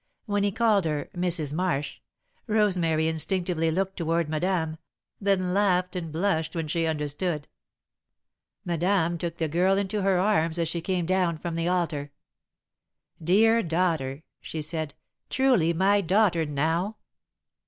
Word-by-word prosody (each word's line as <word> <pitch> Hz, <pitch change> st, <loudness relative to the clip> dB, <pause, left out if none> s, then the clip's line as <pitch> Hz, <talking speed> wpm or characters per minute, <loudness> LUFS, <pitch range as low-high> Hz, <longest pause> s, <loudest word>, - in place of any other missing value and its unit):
When 205 Hz, -2 st, 0 dB
he 205 Hz, -, +1 dB
called 215 Hz, -3 st, +2 dB
her 150 Hz, -2 st, -2 dB
"Mrs. 175 Hz, -5 st, +2 dB
Marsh," 160 Hz, -4 st, -1 dB, 0.5 s
Rosemary 180 Hz, -8 st, +2 dB
instinctively 165 Hz, +1 st, 0 dB
looked 190 Hz, +4 st, -1 dB
toward 165 Hz, -1 st, 0 dB
Madame, 160 Hz, 0 st, -1 dB, 0.4 s
then 190 Hz, -3 st, +1 dB
laughed 185 Hz, -2 st, +1 dB
and 165 Hz, -3 st, -4 dB
blushed 160 Hz, -1 st, -1 dB
when 165 Hz, -2 st, -2 dB
she 165 Hz, +1 st, 0 dB
understood. 150 Hz, +1 st, -2 dB, 1.2 s
Madame 175 Hz, 0 st, +1 dB
took 170 Hz, -1 st, -4 dB
the 160 Hz, -, -1 dB
girl 180 Hz, +5 st, +2 dB
into 200 Hz, +1 st, -1 dB
her 195 Hz, -1 st, +2 dB
arms 175 Hz, -4 st, +1 dB
as 165 Hz, -1 st, 0 dB
she 170 Hz, +1 st, -2 dB
came 180 Hz, 0 st, -1 dB
down 180 Hz, -2 st, +1 dB
from 170 Hz, +1 st, -5 dB
the 165 Hz, +1 st, -1 dB
altar. 165 Hz, -5 st, -1 dB, 1.1 s
"Dear 225 Hz, +7 st, +4 dB
daughter!" 160 Hz, -6 st, -1 dB, 0.2 s
she 155 Hz, -1 st, -5 dB
said. 155 Hz, -1 st, -4 dB, 0.3 s
"Truly 250 Hz, -11 st, +3 dB
my 195 Hz, +4 st, +3 dB
daughter, 185 Hz, -3 st, +2 dB
now!" 165 Hz, +8 st, -1 dB
175 Hz, 135 wpm, -26 LUFS, 160-190 Hz, 1.2 s, Dear